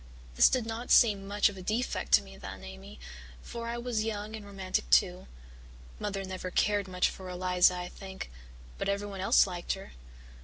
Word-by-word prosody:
This -, -, +6 dB
did 255 Hz, -3 st, 0 dB
not 230 Hz, +2 st, -5 dB
seem 200 Hz, -4 st, +5 dB
much 205 Hz, +1 st, +3 dB
of 205 Hz, -, -4 dB
a -, -, -7 dB
defect 220 Hz, +7 st, -2 dB
to 70 Hz, -, +7 dB
me 65 Hz, 0 st, -13 dB
then, -, -, -9 dB
Amy, 65 Hz, +1 st, -10 dB, 0.4 s
for 235 Hz, 0 st, -6 dB
I 235 Hz, +1 st, -3 dB
was 240 Hz, -2 st, -1 dB
young 215 Hz, 0 st, -4 dB
and 215 Hz, -, -8 dB
romantic 195 Hz, -2 st, -3 dB
too. 180 Hz, -2 st, +3 dB, 0.7 s
Mother 200 Hz, -1 st, -3 dB
never 185 Hz, -1 st, -5 dB
cared 205 Hz, +1 st, +1 dB
much 180 Hz, -1 st, +2 dB
for 185 Hz, -1 st, -7 dB
Eliza, 180 Hz, 0 st, +3 dB
I 180 Hz, 0 st, -4 dB
think, 190 Hz, -, -8 dB, 0.5 s
but -, -, -1 dB
everyone 200 Hz, -1 st, -3 dB
else 195 Hz, -, +5 dB
liked 175 Hz, -3 st, -3 dB
her. 195 Hz, 0 st, -9 dB
195 Hz, 185 wpm, -30 LUFS, 180-210 Hz, 0.7 s, to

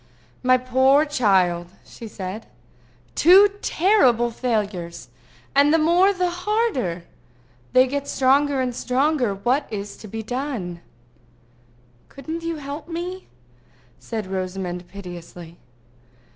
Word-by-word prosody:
"My 255 Hz, 0 st, +4 dB
poor 260 Hz, +4 st, +3 dB
child!" 190 Hz, -, +2 dB, 0.2 s
she 230 Hz, -, -10 dB
said. 205 Hz, +1 st, -7 dB, 0.7 s
"Two 385 Hz, +4 st, +6 dB
terrible 260 Hz, -, +3 dB
failures! 205 Hz, -8 st, -3 dB, 0.4 s
And 285 Hz, +1 st, +5 dB
the 325 Hz, -, +5 dB
more 345 Hz, +5 st, +4 dB
the 365 Hz, -2 st, -1 dB
harder! 355 Hz, -, -1 dB, 0.7 s
They 255 Hz, 0 st, +6 dB
get 280 Hz, +2 st, -3 dB
stronger 275 Hz, +1 st, +2 dB
and 250 Hz, -1 st, -2 dB
stronger. 255 Hz, -2 st, 0 dB
What 250 Hz, +8 st, 0 dB
is 205 Hz, -1 st, -6 dB
to 215 Hz, -, -11 dB
be 220 Hz, +2 st, -6 dB
done?" 225 Hz, -8 st, -4 dB, 1.3 s
"Couldn't 320 Hz, +4 st, -6 dB
you 330 Hz, 0 st, -3 dB
help 290 Hz, +1 st, -7 dB
me?" 355 Hz, +2 st, -6 dB, 0.7 s
said 220 Hz, -3 st, -5 dB
Rosamond 185 Hz, -1 st, -4 dB
piteously. 175 Hz, -3 st, -10 dB
255 Hz, 110 wpm, -22 LUFS, 195-305 Hz, 1.3 s, Two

